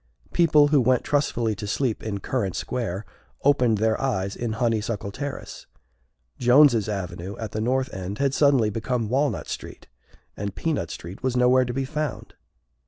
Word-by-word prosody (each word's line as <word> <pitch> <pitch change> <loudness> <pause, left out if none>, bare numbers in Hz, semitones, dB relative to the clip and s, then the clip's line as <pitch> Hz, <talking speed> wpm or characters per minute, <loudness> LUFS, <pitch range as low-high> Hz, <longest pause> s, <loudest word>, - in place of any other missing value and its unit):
People 155 -4 +5
who 145 -3 +4
went 125 0 +2
trustfully 120 -6 0
to 105 +1 -6
sleep 115 +2 -1
in 100 -3 -4
Currant 100 -7 -2
Square 110 -5 -3 0.4
opened 125 -6 +3
their 110 +1 +1
eyes 100 -7 -1
in 120 -2 -3
Honeysuckle 110 -3 -1
Terrace. 140 +5 -6 0.7
Jones's 125 -3 +5
Avenue 95 -1 -5
at 110 -2 -5
the 110 - -3
north 130 +3 0
end 95 +2 -5
had 140 -1 +1
suddenly 135 -7 +3
become 115 +1 -2
Walnut 140 +4 0
Street, - - -7 0.5
and 100 -1 -5
Peanut 160 -3 -1
Street 90 +4 -8
was 130 -1 0
nowhere 125 +1 +4
to 120 - -4
be 135 0 -1
found. 150 -1 -4
120 Hz, 160 wpm, -24 LUFS, 105-135 Hz, 0.7 s, People